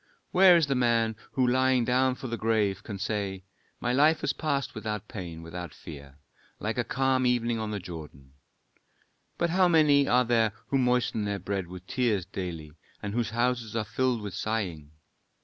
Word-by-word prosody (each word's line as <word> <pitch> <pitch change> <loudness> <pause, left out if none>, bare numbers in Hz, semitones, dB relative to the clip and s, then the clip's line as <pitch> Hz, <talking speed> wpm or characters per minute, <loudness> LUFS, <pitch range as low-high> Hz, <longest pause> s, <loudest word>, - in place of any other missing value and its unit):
Where 185 -1 +7
is 165 - +3
the 140 - 0
man 115 -3 +2 0.2
who 130 - +2
lying 130 0 +3
down 130 +1 +2
for 130 - -10
the 120 -2 -2
grave, 110 -3 0
can 105 -2 -7
say: 100 -2 -3 0.4
My 120 0 -1
life 150 +4 +4
has - - 0
passed 140 -3 -2
without 105 -1 -4
pain, 85 -5 -7
without 85 -2 -7
fear, 70 -3 -11 0.4
like - - -2
a - - +2
calm 130 -1 +1
evening 120 -2 +1
on 110 -1 -3
the 105 - -2
Jordan. 75 -7 -10 1.0
"But 170 -1 0
how 185 +1 +4
many 150 -4 +4
are 125 0 +4
there 115 -3 +2 0.2
who 135 - +2
moisten 125 -4 +1
their 100 0 -1
bread 95 -1 -3
with 90 +1 -10
tears 110 -6 0
daily, 85 -5 -6 0.3
and 105 0 -3
whose 120 0 0
houses 120 -1 -1
are 115 - 0
filled 120 +2 0
with 100 -3 -5
sighing. 95 -8 -3
115 Hz, 180 wpm, -28 LUFS, 95-130 Hz, 1.0 s, Where